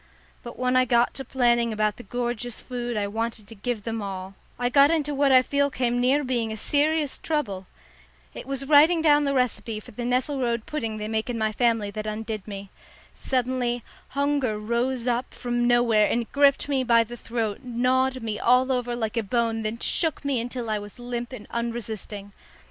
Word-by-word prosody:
But 240 - -9
when 250 0 +1
I 255 0 +5
got 240 -1 +3
to 270 - -5
planning 240 -3 +2
about 215 -1 0
the - - -8
gorgeous 245 -1 -4
food 245 -2 -4
I 205 - 0
wanted 225 +1 -3
to 225 - -10
give 225 0 -4
them 225 0 -3
all, 190 -1 -6 0.2
I 245 - 0
got 280 +3 +6
into 300 -3 +1
what 280 0 +3
I 255 -1 +7
feel 280 +1 +1
came 245 -2 0
near 270 +4 +3
being 240 -4 -1
a 220 - -5
serious 295 +4 +1
trouble. 200 - -2 0.7
It - - -9
was 275 0 -2
writing 315 +3 +6
down 295 -2 +5
the 280 0 0
recipe 225 -4 0
for - - -13
the 230 - -7
nesselrode 245 -1 0
pudding 230 -9 -3
they 210 0 -4
make 220 +2 -2
in 240 - -2
my 220 -1 0
family 225 -3 +1
that 215 +1 -5
undid 215 -1 -4
me. 200 -1 -7 0.4
Suddenly 250 -2 -1 0.3
hunger 280 -6 +1
rose 235 +3 -1
up 245 +1 -1
from 240 0 -1
nowhere 235 -3 +4
and 235 -1 -1
gripped 280 -1 +3
me 275 -2 +1
by 235 -2 +5
the 235 +2 -9
throat, 225 -3 -3
gnawed 255 +1 0
me 215 -2 -3
all 255 +2 +4
over 245 -1 -1
like 225 -1 -3
a - - +3
bone, 225 +1 0
then 215 +1 -3
shook 315 +4 0
me 270 -4 +1
until 240 0 -5
I 215 - 0
was 205 +2 -10
limp 240 0 -5
and 235 -5 -8
unresisting. 220 -3 -4
240 Hz, 195 wpm, -25 LUFS, 220-260 Hz, 0.7 s, I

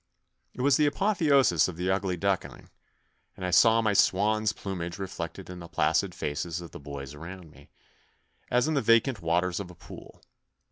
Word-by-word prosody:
It - - -5
was 140 0 +4
the 150 - +3
apotheosis 145 - +3
of 90 -3 -7
the 90 +2 0
ugly 95 -1 -1
duckling, 100 +1 -3 0.7
and 95 - -5
I 90 - -2
saw 115 +4 +5
my 110 -2 +2
swan's 105 +2 +2
plumage 90 -5 -5
reflected 95 -1 -6
in 90 -1 -8
the 85 - -9
placid 85 - 0
faces 80 +4 -3
of 85 -3 -10
the - - -9
boys 70 -1 -8
around 85 +2 -10
me, 70 0 -18 0.8
as 125 +3 +2
in 160 - 0
the 140 - +1
vacant 115 0 +3
waters 85 +2 0
of 100 -3 -6
a 90 - -13
pool. - - -13
95 Hz, 180 wpm, -28 LUFS, 85-115 Hz, 0.8 s, saw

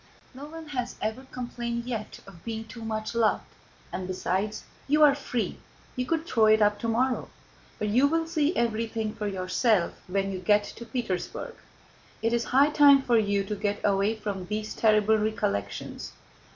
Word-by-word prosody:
No 270 +3 -8
one 320 0 -9
has 250 -4 -3
ever 220 +5 -3
complained 235 -1 -4
yet 225 -4 -5
of 180 -4 -14
being 225 -1 -4
too 230 +1 -10
much 220 0 -3
loved; 230 -2 +2 0.5
and 185 0 -3
besides, 190 +3 -2 0.2
you 300 +2 +4
are 290 -2 +8
free, 250 -4 -3 0.4
you 250 -1 -2
could 325 -1 0
throw 225 -8 +3
it 215 0 +6
up 205 -1 +3
tomorrow. 245 +3 0 0.5
But 210 - -2
you 250 +7 +4
will 325 +2 +1
see 320 0 0
everything 225 -1 -1
for 210 - -4
yourself 190 +1 +1
when 195 +1 -1
you 190 - -4
get 205 +3 +3
to 235 +3 -9
Petersburg. 225 -9 -3 0.7
It 230 +1 +2
is 235 0 +1
high 280 +4 +4
time 285 -2 +7
for 235 -3 +4
you 205 -2 +1
to 205 +2 -4
get 205 0 -1
away 200 +2 +2
from 200 -4 -5
these 215 +2 -3
terrible 215 0 +3
recollections." 100 - -2
220 Hz, 170 wpm, -27 LUFS, 205-250 Hz, 0.7 s, are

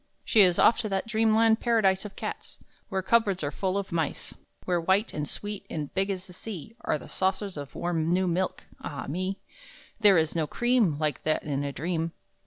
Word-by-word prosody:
She 220 - +5
is 180 -3 +5
off 235 - +5
to 220 -3 -2
that 195 -1 -1
dream 220 -1 +2
land 225 0 +4
paradise 210 -5 +2
Of 205 - -8
cats, - - -6 0.3
where 190 -2 -1
cupboards 200 -5 +2
are 145 - -1
full 190 +5 -1
of 200 -1 -3
mice; 160 -3 -2 0.3
Where 175 -2 +1
white 190 +6 +2
and 150 -1 -3
sweet 205 -1 -5
and 150 -3 -4
big 195 +1 0
as 190 -1 -3
the 180 - -13
sea 210 +2 -8
Are - - +1
the - - -12
saucers 190 +1 -1
of 145 -2 -8
warm 165 -2 -1
new 185 +1 +2
milk 180 +2 -1 0.2
ah 135 -4 -5
me, 185 +6 -2 0.6
There 205 -4 +6
is 160 0 +1
no 160 -2 0
cream 240 - +2
Like 155 -1 -1
that 155 - 0
in 145 -2 -2
a 140 - -2
dream! 165 +4 -2
185 Hz, 205 wpm, -27 LUFS, 160-205 Hz, 0.6 s, There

